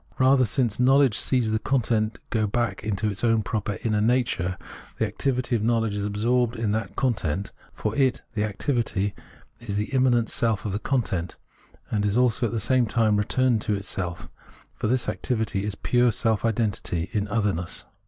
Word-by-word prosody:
Rather, 130 0 +5
since 120 0 0
knowledge 135 -2 +5
sees 125 -4 +1
the 110 - +1
content 115 -4 0
go 110 -2 +1
back 120 +3 -1
into 105 0 -1
its 100 0 -3
own 115 -2 +3
proper 105 -1 -2
inner 110 -2 +1
nature, 110 -6 +1 0.4
the - - +1
activity 125 -2 -1
of 110 - 0
knowledge 115 -2 +1
is 100 0 -2
absorbed 115 +3 +1
in 110 -2 -1
that 110 +1 -2
content 100 - -1
— - - -26
for 105 0 -3
it 130 -3 +1
(the 105 -2 0
activity) 105 -2 -1 0.5
is 110 -4 -5
the 105 +5 -2
immanent 125 -3 +3
self 115 -4 0
of 105 - -1
the 100 - -2
content 100 - -1 0.3
— - - -29
and 105 -2 0
is 105 +2 +1
also 125 -1 +2
at - - -5
the 115 - -1
same 120 +2 +2
time 110 -1 +2
returned 120 +4 +2
into 105 - 0
itself, 95 -3 -4 0.5
for - - -3
this 125 +2 +1
activity 110 -5 -1
is 105 -1 -3
pure 120 +2 +2
self 110 0 0
identity 105 -6 -1
in 105 -1 0
otherness. 100 -6 -1
110 Hz, 185 wpm, -25 LUFS, 105-120 Hz, 0.5 s, Rather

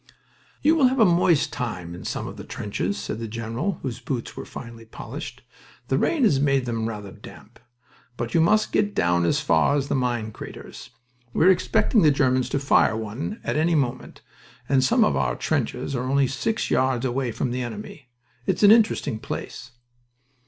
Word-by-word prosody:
"You 315 +3 +5
will 280 -5 +5
have 260 +1 0
a 220 - +7
moist 170 -4 +3
time 90 -8 -4
in 90 - -9
some - - -3
of - - -7
the - - -9
trenches," 100 -1 -3
said 110 - -5
the 115 - -4
general 115 - -3
(whose 125 -3 -4
boots 125 -1 -5
were - - -7
finely 115 -1 -10
polished). 125 +3 -8 0.5
"The 135 - +2
rain 315 -5 +1
has 150 - +4
made 135 -2 +2
them 115 -2 -2
rather 105 -3 -7
damp... - - -14 0.6
But 120 0 -4
you 165 - +4
must 215 +6 +3
get 205 -1 +1
down 85 0 +2
as 85 - +1
far 80 - +3
as 140 -1 -1
the - - 0
mine 120 -4 -1
craters. - - -10 0.4
We're 185 +4 +5
expecting 205 +4 +2
the 155 - +6
Germans 130 -3 +2
to - - 0
fire 135 -5 +3
one 110 - -5
at - - -1
any 165 +2 +2
moment, 125 -4 -2 0.5
and 135 -2 +3
some 130 - +4
of 70 - +2
our 65 -3 0
trenches 140 - -2
are 125 +1 -2
only 140 0 +3
six 180 - -2
yards 130 -1 +1
away 125 -1 -1
from 120 +2 -2
the 125 +1 -2
enemy. 120 +2 -8 0.4
It's - - 0
an 205 - +9
interesting 215 - +3
place." 120 - -7
130 Hz, 190 wpm, -24 LUFS, 115-150 Hz, 0.6 s, an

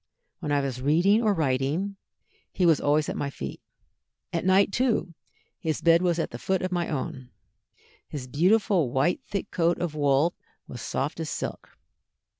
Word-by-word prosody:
When 150 - -3
I 145 -1 +3
was 130 -2 -3
reading 175 - +4
or 220 -3 +3
writing, 155 +4 0 0.6
he 180 - +1
was 165 -4 +4
always 150 +1 +2
at - - -3
my 140 - -2
feet. 70 - -7 0.7
At 165 - -1
night, 190 +2 +4
too, 230 -7 0 0.5
his 160 -1 -2
bed 170 0 +5
was 175 -2 +1
the 125 -7 -3
foot 190 +5 0
of 185 - -2
my 175 -2 -1
own. 130 -3 -4 0.8
His 140 -4 -6
beautiful 180 - +2
white 135 +8 +1
thick 200 0 -4
coat 170 0 +2
of 175 -3 -2
wool 145 +2 +2 0.3
was 120 - -8
soft 145 +7 -3
as 160 -2 -3
silk. - - -6
165 Hz, 165 wpm, -26 LUFS, 140-185 Hz, 0.8 s, bed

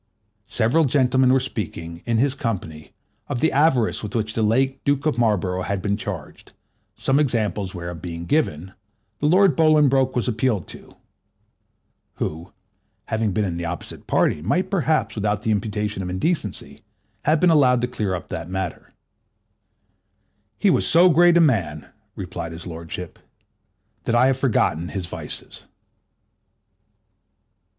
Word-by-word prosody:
Several 135 +9 +2
gentlemen 130 -1 +3
were 135 - +4
speaking, 85 -9 -6
in 115 -1 +1
his 135 +3 +2
company, 95 - -5 0.4
of 135 -4 -3
the 160 - +2
avarice 135 -6 +2
with 105 0 -6
which 110 -1 -1
the 115 - -1
late 130 +5 +1
Duke 140 +1 0
of 150 -6 0
Marlborough 95 -5 +1
had 100 +1 -2
been 100 +2 -1
charged, 95 -7 -7 0.4
some 135 +2 +1
examples 105 -9 -1
whereof 85 -1 -6
being 85 -1 -6
given, 95 - 0 0.5
the 150 - +1
Lord 185 +3 +4
Bolingbroke 145 -5 +3
was 125 - 0
appealed 115 -5 0
to - - -9 1.2
(who, 80 +3 -5 0.6
having 110 -1 0
been 105 +2 0
in 85 -3 -3
the 85 - -4
opposite 85 +1 -6
party, 75 - +1
might 145 - 0
perhaps, 160 -5 +1
without 105 -1 -1
the 110 - 0
imputation 105 -1 -2
of 90 - -4
indecency, 95 - -3 0.4
have 155 +1 +3
been 180 +1 +4
allowed 130 -6 +4
to 125 - 0
clear 100 -6 -2
up 90 - -8
that 80 +1 -5
matter): 95 -2 -5 1.6
"He 200 - +3
was - - +2
so 175 +2 +6
great 175 +2 +5
a - - +6
man," 85 - +1 0.3
replied 90 -4 -6
his 80 - -9
lordship, 85 0 -7 0.9
"that 115 - +1
I 120 +2 +5
have 130 0 +2
forgot 105 - +1
his 90 +2 -4
vices." 85 - -7
110 Hz, 145 wpm, -22 LUFS, 90-135 Hz, 1.6 s, so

